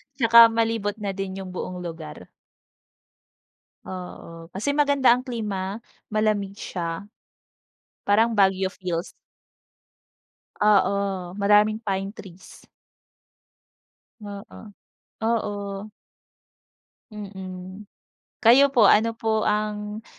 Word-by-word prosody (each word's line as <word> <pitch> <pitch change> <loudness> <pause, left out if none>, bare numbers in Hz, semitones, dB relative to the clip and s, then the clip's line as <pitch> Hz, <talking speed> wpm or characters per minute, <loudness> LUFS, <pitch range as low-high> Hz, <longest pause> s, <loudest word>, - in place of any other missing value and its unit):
'Tsaka 230 -2 +7
malibot 225 -2 0
na 200 - -2
din 195 -1 -5
yung 185 - -8
buong 180 0 -5
lugar. 165 - -8 1.6
Oo, 170 -2 -9
kasi 220 +11 -2
maganda 285 -4 +4
ang 250 - -1
klima, 210 -6 -4 0.3
malamig 210 -2 0
siya. 170 0 -5 1.0
Parang 220 +3 +3
Baguio 190 -1 +3
feels. 180 -3 -4 1.5
Oo, 200 -3 +1
maraming 210 +2 +3
pine 195 -1 -2
trees. 185 -1 -14 1.5
Oo, 205 +1 -10 0.6
oo. 205 -3 -2 1.2
Mm. 190 -1 -9 0.6
Kayo 270 +5 +7
po 240 -6 +4
ano 225 +3 +4
po 220 -1 0
ang 210 +1 -2
205 Hz, 85 wpm, -24 LUFS, 190-220 Hz, 1.6 s, Tsaka